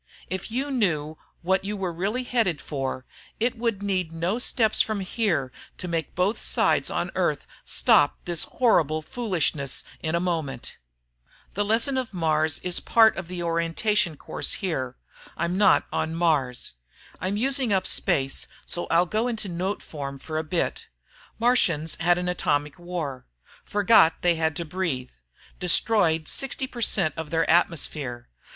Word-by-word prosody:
If 185 -1 -3
you 265 +5 -2
knew 160 - 0 0.2
what 190 +2 +1
you 205 +1 -3
were 185 -3 -3
really 200 +9 -2
headed 225 -11 0
for, 135 -3 -4 0.3
it 235 +2 +1
would 230 -4 -2
need 185 -4 0
no 170 +7 -1
steps 225 -3 +2
from 215 -2 -1
here 185 - -1 0.3
to 180 - -5
make 165 -2 -3
both 185 +5 0
sides - - +2
on - - -2
Earth - - 0 0.2
stop - - +4
this 175 -3 0
horrible 155 - +2
foolishness 170 - -1 0.2
in 160 +1 -1
a - - +2
moment. 160 -8 -3 0.8
The 205 - 0
lesson 230 +6 +1
of 240 -6 -5
Mars 155 -2 +1
is 180 -1 +2
part 225 -1 +5
of 190 -3 -6
the 180 -1 -5
orientation 170 +1 0
course - - -2
here. 130 - -3 0.4
(I'm 170 +2 -1
not 200 0 +4
on 160 +1 -1
Mars). 150 -7 0 0.5
I'm 190 +2 -1
using 260 0 +1
up 190 -1 +2
space, 135 -6 +1 0.2
so 175 - -3
I'll 175 +2 +4
go 215 +6 0
into 225 -5 -2
note 185 +4 -3
form 140 -3 -6
for 155 +3 -4
a - - -2
bit. 165 +2 -2 0.5
Martians 180 -10 +2
had 175 +1 +3
an 180 0 -2
atomic 145 -4 -1
war 170 -7 -5 0.4
forgot 205 -5 +4
they 175 -1 +5
had 160 -1 0
to 170 - -3
breathe... 155 -7 -3 0.5
destroyed 175 -3 +3
60 270 0 -1
per 245 -2 -8
cent 185 -8 +2
of 160 -2 -5
their 165 +1 +1
atmosphere 145 - 0
175 Hz, 155 wpm, -25 LUFS, 155-210 Hz, 0.8 s, part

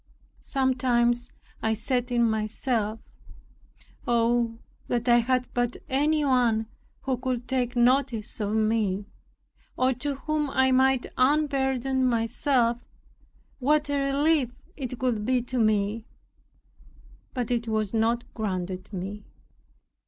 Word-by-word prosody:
Sometimes 245 -3 +1 0.3
I 220 0 +1
said 245 +3 -1
in 235 -1 +3
myself, 220 0 -1 1.1
"Oh, 235 -1 +2 0.3
that 240 0 -1
I 240 0 +6
had 255 +1 +1
but 245 0 -1
any 295 +3 +2
one 240 -4 +2 0.4
who 260 -2 -1
could 250 -1 -3
take 250 -2 -1
notice 240 -3 +2
of 210 0 -1
me, 215 -3 +1 0.7
or 255 +1 +3
to 280 +3 -3
whom 300 +1 -2
I 265 -1 +2
might 260 0 +3
unburden 265 -2 +1
myself, 240 0 +1 0.8
what 295 +2 +2
a 275 -1 0
relief 290 -2 +2 0.3
it 255 -3 -5
would 230 -5 0
be 255 +3 +2
to 250 0 -3
me!" 215 0 +1 1.3
But 245 -2 -2
it 235 -1 -1
was 215 -2 -1
not 230 +1 +1
granted 185 -3 -4
me. 200 +2 -5
245 Hz, 115 wpm, -26 LUFS, 225-265 Hz, 1.3 s, I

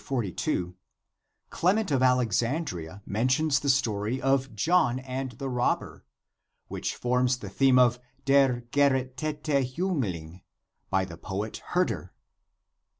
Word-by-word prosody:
42, 95 -7 -2 0.8
Clement 195 +2 +1
of 135 -2 +2
Alexandria 120 - 0
men 110 +5 0
tions 145 +3 +2
the 140 - -2
story 115 -3 +1
of 135 -2 0
John 125 - +2
and 130 0 -5
the 135 +4 -6
robber, 125 -1 -1 0.6
which - - -4
forms 125 +1 +1
the 105 -5 -8
theme 130 +5 +3
of 125 -1 +4
" 135 +1 -38
Der 135 -3 +4
gerettete 140 +2 0 0.3
Jiingling 95 - -2 0.2
" - - -58
by 95 -1 +1
the 85 -3 -10
poet 105 +4 -4
Herder. 175 - -2
125 Hz, 125 wpm, -27 LUFS, 110-135 Hz, 0.8 s, of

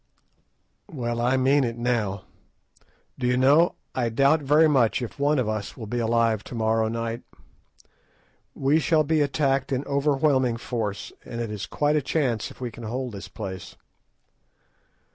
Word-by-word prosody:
"Well, 120 -4 -3
I 125 +2 +2
mean 135 +2 +3
it 115 -1 -2
now. 110 -5 -1 1.0
Do 125 - 0
you 125 0 +2
know, 145 +7 +4 0.2
I 120 -2 0
very 145 +5 +4
much 130 -7 +3
doubt 120 -3 -4
if - - -22
one 145 +1 +2
of 125 -4 0
us 110 -1 -4
will 115 - -6
be 120 +3 -3
alive 115 -2 +1
to - - -8
morrow 110 0 +1
night. 115 +1 -3 1.3
We 140 +4 +2
shall 160 -1 +2
be 155 +1 +1
attacked 140 -2 0
in 130 0 0
overwhelming 140 -3 +1
force, 105 -5 -4
and 115 - -7
it 115 -2 -3
is 105 -2 -5
quite 150 0 +1
a 150 - +2
chance 130 -6 -1
if - - -15
we 125 -2 -4
can 120 - -11
hold 125 +3 -3
this 100 -2 -8
place." 95 -4 -7
125 Hz, 160 wpm, -25 LUFS, 115-140 Hz, 1.3 s, know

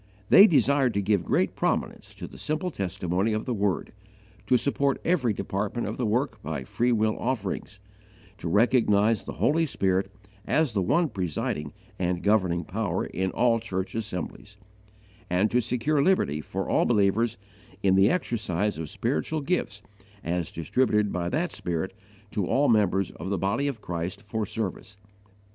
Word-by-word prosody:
They 200 - +9
desired 140 - +3
to 100 - +2
give 100 -2 +2
great - - +1
prominence - - -2
to - - -7
the - - -12
simple 155 +4 -2
testimony 95 - -1
of 110 - -2
the 125 - -1
Word, 100 -3 -1 0.5
to 125 - +5
support 140 +1 +1
every 155 -10 +2
department 100 +3 -2
of - - -4
the 125 - 0
work 110 0 -1
by 80 -8 -4
free 120 - 0
will 110 -2 +2
offerings, 105 -4 -3 0.6
to - - -5
recognize 105 0 +3
the - - -7
Holy 165 +2 +2
Spirit 95 -5 0 0.4
as 155 -6 +2
the 100 - +1
one 170 - +2
presiding 75 - -3 0.3
and 90 -1 -1
governing 95 -5 +2
Power 95 0 -2
in 95 0 -2
all 115 +3 +2
church 95 -4 -4
assemblies, 100 -1 -5 0.7
and 95 +4 +2
to 125 - +3
secure 130 +6 0
liberty 140 - +2
for - - -4
all - - +2
believers 110 0 +2 0.5
in 95 -1 +4
the 95 +2 +5
exercise 105 - -1
of 80 -2 -5
spiritual 145 - -2
gifts 175 +5 -2 0.4
as 85 0 -2
distributed 105 +4 +1
by 85 -1 -1
that 160 - -1
Spirit 90 -2 -3 0.4
to 100 -4 -1
all 145 +2 +2
members 100 -4 +2
of 90 +4 -7
the 100 - 0
Body 100 +10 0
of 130 -6 -4
Christ 90 +3 -4
for 105 0 -3
service. 100 -1 -5
105 Hz, 160 wpm, -26 LUFS, 95-125 Hz, 0.7 s, They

